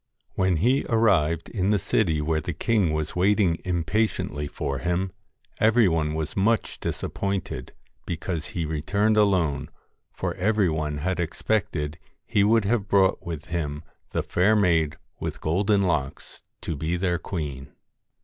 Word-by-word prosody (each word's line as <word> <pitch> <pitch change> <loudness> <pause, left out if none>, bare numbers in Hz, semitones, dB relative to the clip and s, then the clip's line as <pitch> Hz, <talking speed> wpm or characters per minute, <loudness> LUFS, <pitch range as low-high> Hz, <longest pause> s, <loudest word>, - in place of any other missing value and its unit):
When 95 -2 +2
he 125 - +2
arrived 85 -9 +2
in 95 -3 0
the 105 - +4
city 80 -6 +1
where 80 +1 0
the 85 +1 -4
king 100 -3 +2
was 75 -1 -2
waiting 95 -2 +3
impatiently 85 -4 -1
for 70 -2 -3
him, 90 +3 -1 0.5
every 110 0 +5
one 80 -3 0
was 80 -1 -3
much 110 +4 +1
disappointed 100 -10 -3 0.3
because 85 -1 -3
he 85 -3 -3
returned 100 +8 +1
alone, 85 -9 +2 0.4
for - - -3
every 105 -1 +2
one 75 -2 -2
had 90 +5 -1
expected 80 -3 -1 0.3
he 100 - +2
would 110 0 +4
have 105 -1 +1
brought 95 -1 +3
with 80 -3 -6
him 75 -3 -3 0.3
the - - -1
fair 100 +5 +3
maid 85 -7 +2 0.2
with - - -4
golden 100 +5 +2
locks 80 -7 -2 0.2
to 80 - -3
be 80 +5 -1
their 90 -1 0
queen. 75 -7 -5
90 Hz, 145 wpm, -25 LUFS, 80-100 Hz, 0.5 s, every